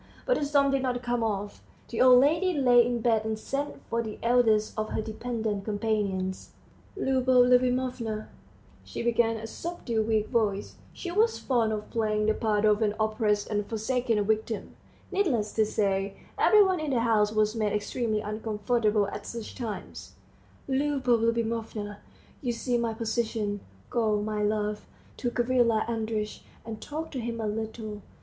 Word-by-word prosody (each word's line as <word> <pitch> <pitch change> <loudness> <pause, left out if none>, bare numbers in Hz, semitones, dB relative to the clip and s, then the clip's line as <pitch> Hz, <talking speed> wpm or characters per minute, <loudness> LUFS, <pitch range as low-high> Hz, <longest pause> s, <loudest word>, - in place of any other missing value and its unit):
But - - +2
the - - -1
storm 280 -1 +3
did 275 -1 +1
not 250 -1 -1
come 240 -1 0
off. 205 -2 -3 0.3
The 225 - -1
old 250 -1 +8
lady 325 +6 +2
lay 245 -4 +6
in 240 0 -1
bed 225 -2 +2
and 220 0 -2
sent 275 +6 -4
for 230 - 0
the 220 -2 -6
eldest 230 -3 +3
of 215 0 -2
her - - -2
dependent 220 -2 -3
companions. 205 -3 -2 0.4
"Liubov 260 -6 +4
Liubimovna," 250 -3 +1 0.6
she - - -6
began 235 -1 +2
in 220 - -6
a - - -3
subdued 230 -5 -3
weak 220 -1 +1
voice 205 -3 0
she 350 - -6
was 445 +5 +2
fond 235 -4 +1
of 210 -1 -4
playing 215 -2 0
the 215 - +3
part 215 -1 +1
of 210 +1 +3
an 210 -1 +1
oppressed 215 -1 +1
and 205 -1 -1
forsaken 230 0 0
victim; 220 0 -2 0.4
needless 265 - +1
to 220 -1 +2
say, 195 -2 0 0.2
every 425 -1 +6
one 375 -3 +1
in 310 -1 -2
the 250 -4 +1
house 215 -3 +3
was 215 0 +1
made 215 -2 0
extremely 215 +1 -1
uncomfortable 215 0 0
at 205 - -7
such 230 -2 -6
times 225 -4 -6 0.5
"Liubov 265 -3 +1
Liubimovna, 225 -2 -1 0.4
you 250 -4 -1
see 245 +1 -1
my 230 -2 0
position; 220 -2 -1 0.3
go, 215 -3 +2
my 210 0 -2
love, 210 0 -1 0.3
to 245 - -1
Gavrila 240 -2 +2
Andreitch, 220 -2 -3 0.2
and 220 -1 -7
talk 315 +2 -5
to 265 - -4
him 230 -1 -4
a 220 - -2
little. 215 0 -4
225 Hz, 165 wpm, -28 LUFS, 215-245 Hz, 0.6 s, old